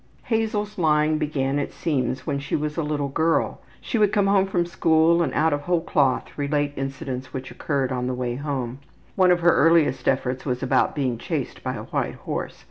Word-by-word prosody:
Hazel's 215 -3 -1
lying 155 -1 +3
began, 145 -2 0
it 145 - -3
seems, 130 -6 -2
when 140 - -1
she 140 - -3
was 150 0 -2
a 165 - 0
little 150 -2 -1
girl. 160 +4 0 0.2
She 230 - -2
would 210 -2 +4
come 205 -2 +2
home 195 -1 +3
from 175 -3 0
school 165 0 +3
and 170 - 0
out 160 0 +3
of 145 - -1
whole 175 +2 +1
cloth 135 -5 0
relate 145 0 0
incidents 135 -1 -5
which 130 -1 -6
occurred 135 -3 -1
on 125 -1 -2
the 130 - -1
way 125 -1 -2
home. 130 -2 -4 0.4
One 185 -1 +4
of 175 -1 +3
her 170 0 +5
earliest 155 -6 +3
efforts 125 +1 0
was 125 -1 -2
about 130 - +2
being 130 -5 -1
chased - - -4
by - - -3
a - - -6
white - - -2
horse. - - -5
150 Hz, 205 wpm, -24 LUFS, 135-170 Hz, 0.4 s, her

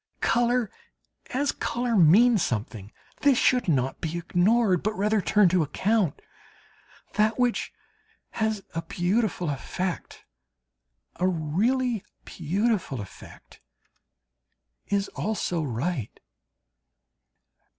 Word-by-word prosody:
Colour 240 -2 +1 0.6
as 280 +3 0
colour 240 -1 -2
means 205 +5 +6
something; 110 -4 -3 0.3
this 280 -3 +4
should 250 -3 +2
not 135 -5 0
be 165 0 -3
ignored, 185 +3 +2
but 215 +1 -2
rather 210 +1 +1
turned 190 0 +3
to 180 -1 +3
account. 185 +3 0 0.9
That 215 +1 +2
which 245 -2 0 0.6
has 220 -2 -1
a 165 - -2
beautiful 180 -1 -1
effect, 180 +6 -5 0.9
a 180 - +1
really 205 - 0 0.2
beautiful 185 - -1
effect, 100 -2 -12 1.3
is 200 0 0
also 200 -5 -2
right. 135 - -3
195 Hz, 95 wpm, -26 LUFS, 165-230 Hz, 1.3 s, means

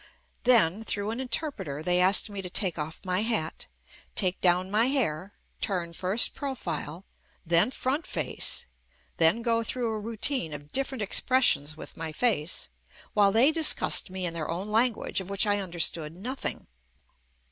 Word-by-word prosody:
Then 220 -5 +4
through 205 -1 -1
an 230 - -5
interpreter, 230 - -2
they 180 +1 +2
asked 185 +2 +5
me 200 -2 -6
to 180 - -7
take 180 -3 -1
off 150 +2 -5
my 185 +1 0
hat, 215 -8 -2 0.5
take 185 0 0
down 180 +1 +2
my 220 +4 +3
hair, 205 - -1 0.3
turn 175 -4 -2
first 190 +6 +2
profile, 180 - -5 0.4
then 170 +6 +4
front 265 +4 -2
face, - - 0 0.5
then 170 +8 +3
go 230 -1 +2
through 235 +1 -2
a 215 - -3
routine 225 - -1
of 145 0 -11
different 265 -3 -2
expressions 200 - +2
with - - -9
my 160 -1 -5
face, 180 -4 -1 0.4
while 205 -3 +4
they 240 +8 +5
discussed 315 - +3
me 185 0 -4
in 170 - -2
their 165 -2 -4
own 180 +5 -4
language 225 -2 +1
of 190 - -10
which 200 +1 +2
I 205 -1 +1
understood 170 -4 -1
nothing. 250 +9 -4
200 Hz, 160 wpm, -27 LUFS, 170-235 Hz, 0.5 s, asked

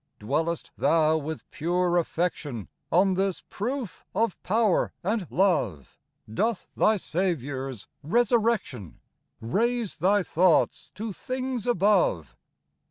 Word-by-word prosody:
Dwellest 160 +9 -2
thou 160 -1 +3
with 160 0 -4
pure 175 +2 0
affection 160 - -3 0.2
On 190 +3 +4
this 190 0 -1
proof 240 -2 -4
of 225 -4 0
power 215 -1 +2
and 205 -1 -1
love? 150 - 0 0.3
Doth 215 - -1
thy 215 0 +3
Saviour's 140 - -3
resurrection 215 - 0 0.4
Raise 230 - -1
thy 200 +2 +3
thoughts 175 0 +2
to 215 +1 -4
things 255 0 -3
above 195 - +2
180 Hz, 100 wpm, -26 LUFS, 155-215 Hz, 0.4 s, On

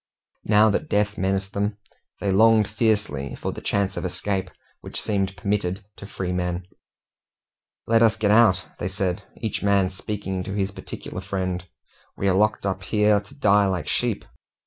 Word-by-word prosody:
Now 105 +1 +5
that - - -2
death 105 0 +1
menaced 95 +1 -1
them, 100 +1 -1 0.4
they 100 - 0
longed 110 +1 +5
fiercely 105 - 0
for - - -3
the - - -8
chance 100 -1 0
of - - -4
escape 95 +1 -2 0.3
which - - -5
seemed 95 -2 -1
permitted 100 0 -1
to 100 - -9
freemen. 90 -2 -2 1.2
"Let 115 0 +3
us 115 -1 +5
get 105 -2 +1
out!" 105 -4 +5
they 90 - -1
said, 95 -2 -2 0.2
each 110 -3 -3
man 100 -2 +3
speaking 95 -1 -4
to 100 - -4
his 100 -1 0
particular 95 - -7
friend. 95 -2 -3 0.5
"We 100 - 0
are 95 - +4
locked 105 +2 +2
up 95 -1 -1
here 105 +1 +3
to 105 +7 -15
die 105 -7 +4
like 90 -6 -2
sheep." 120 +2 0
100 Hz, 165 wpm, -24 LUFS, 95-105 Hz, 1.2 s, Now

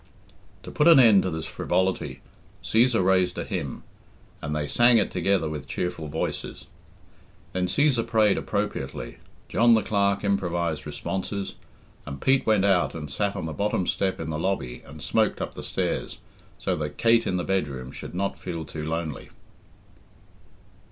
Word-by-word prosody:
To - - -8
put 150 - +3
an 165 -5 +9
end 110 -6 +7
to 95 - -1
this 80 -2 -4
frivolity, 90 -8 -1 0.4
Cæsar 115 -3 +3
raised 95 -1 +2
a - - -2
hymn, - - -4 0.6
and 75 +1 -3
they 75 -1 -1
sang 120 - +5
it 110 - +1
together 90 -2 +1
with 75 -3 -5
cheerful 90 -3 -3
voices. 80 +2 -4 0.9
Then 90 0 0
Cæsar 135 +2 +2
prayed 110 -3 +4
appropriately, 100 -10 -3 0.3
John 120 0 +5
the 110 - +2
Clerk 100 -1 +1
improvised 85 -6 -1
responses, 95 +6 -4 0.5
and 70 -2 -6
Pete 135 - +2
went 105 -3 +4
out 95 -4 +2
and 75 -4 -6
sat 100 +7 -1
on - - -4
the 80 - -4
bottom 100 +1 0
step 95 +1 0
in 80 -1 -4
the 75 - -3
lobby 80 -9 -2
and - - -10
smoked - - +1
up - - -4
the - - -7
stairs, - - -2 0.4
so - - -1
that 75 -1 -4
Kate 115 0 +4
in 90 - 0
the 90 - -1
bedroom 70 -10 -2
should - - -8
not 100 +2 -2
feel 85 -3 -5
too 75 -1 -6
lonely. 80 -2 -4
95 Hz, 165 wpm, -26 LUFS, 80-105 Hz, 0.9 s, an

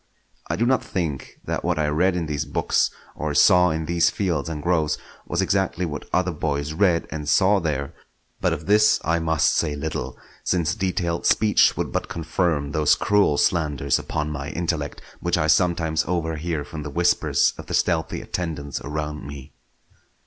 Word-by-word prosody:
I - - 0
do 120 - +1
not 130 +1 +2
think 80 -8 -4
that - - -3
what 90 -1 0
I 75 -1 +1
read 90 +5 +2
in 85 -2 -1
these 75 -1 -2
books 70 - +1 0.3
or 75 -2 -3
saw 90 0 +6
in 80 -1 -2
these 85 0 +3
fields 85 -6 -1
and 75 -2 -5
groves 80 -4 +1 0.3
was - - 0
exactly 95 -2 0
what 75 -3 -6
other 90 0 +1
boys 75 -1 -2
read 85 -1 +2
and 75 -2 -4
saw 100 +1 +4
there; 75 -5 -2 0.5
but - - +1
of 75 - -4
this 105 +2 +4
I 85 +2 +2
must 80 -2 +2
say 75 -3 0
little, 70 -4 -4 0.3
since 85 -3 +1
detailed 90 -4 -1
speech 105 -1 +4
would - - -2
but - - -2
confirm 80 -3 -1
those 75 0 +3
cruel 100 -8 +2
slanders 75 -5 +1
upon 75 0 -3
my 70 -1 -5
intellect 80 -4 -3 0.2
which - - 0
I 75 - +1
sometimes 80 -1 +2
overhear 80 -2 -2
from 80 -3 -7
the 75 - -5
whispers 85 +4 +2
of - - -9
the - - -1
stealthy - - 0
attendants 75 -6 -4
around 75 0 -4
me. 70 -1 -10
80 Hz, 175 wpm, -23 LUFS, 75-90 Hz, 0.5 s, saw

